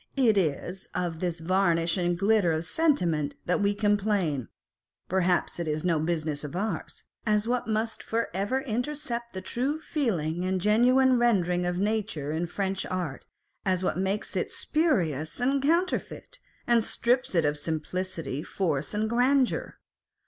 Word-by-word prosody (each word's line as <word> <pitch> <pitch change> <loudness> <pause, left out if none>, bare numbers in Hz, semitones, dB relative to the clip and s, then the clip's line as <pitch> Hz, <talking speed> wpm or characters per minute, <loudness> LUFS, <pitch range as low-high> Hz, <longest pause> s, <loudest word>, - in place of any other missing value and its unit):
It 240 -5 +4
is 180 +1 -1
of 170 -3 -2
this 175 -2 -2
varnish 170 -2 +2
and 175 -2 0
glitter 200 -3 +3
of 160 +1 -1
sentiment 175 - +1
that 180 +4 +1
we 205 0 +2
complain 205 - +1 0.6
(perhaps 180 -1 +1
it 170 - -2
is 155 0 -1
no 165 -3 +2
business 155 -2 -2
of 150 +3 -6
ours) 210 +4 -3 0.2
as 215 -1 +1
what 245 -1 0
must 220 +1 -1
for 230 +1 -1
ever 205 +8 0
intercept 245 -1 -3
the 190 - -5
true 265 +10 -1
feeling 180 - -1
and 185 0 0
genuine 250 +6 +4
rendering 180 -7 +2
of 175 0 -1
nature 200 -7 -1
in 165 +3 -1
French 190 +1 -2
art, 175 -7 -4 0.4
as 185 -1 0
what - - 0
makes 195 +2 -1
it - - 0
spurious 175 - 0
and 270 +3 +2
counterfeit, 335 +6 -1 0.3
and 235 -2 +4
strips 245 -1 0
it 165 -3 +3
of 145 0 +1
simplicity, 160 -1 -3
force, 155 -2 -2
and 215 +1 +1
grandeur. 250 +3 +1
190 Hz, 150 wpm, -27 LUFS, 170-235 Hz, 0.6 s, It